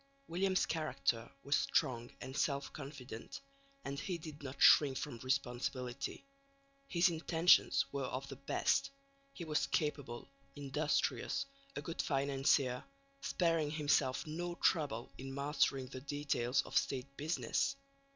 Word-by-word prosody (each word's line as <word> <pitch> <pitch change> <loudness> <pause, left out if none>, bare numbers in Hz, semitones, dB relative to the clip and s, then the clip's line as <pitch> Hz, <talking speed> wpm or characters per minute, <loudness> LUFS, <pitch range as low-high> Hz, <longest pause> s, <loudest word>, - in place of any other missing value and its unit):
William's 185 +2 +1
character 150 -7 -1
was 140 +1 +2
strong 120 -3 +1
and 130 - -6
self 140 -1 0
confident, 135 -5 -8 0.5
and 140 +1 -3
he 180 +2 -2
did 155 -2 -9
not 140 -1 -7
shrink 140 -3 +7
from 135 -6 -4
responsibility. 130 - -2 0.6
His 175 -4 +4
intentions 165 -3 +4
were 140 -1 -2
of 130 +2 -4
the 135 - -7
best; 140 +1 +1 0.4
he 175 - -7
was 155 -1 +1
capable, 145 -6 -2 0.3
industrious, 145 - 0 0.3
a - - -4
good 165 - -2
financier, 135 -2 +2 0.4
sparing 165 - +1
himself 145 -2 +1
no 175 +3 -4
trouble 145 -11 +1
in 135 +1 -6
mastering 140 -2 +1
the 130 0 -8
details 140 -3 0
of - - -9
State 140 0 0
business. 165 - 0
140 Hz, 125 wpm, -36 LUFS, 130-155 Hz, 0.6 s, shrink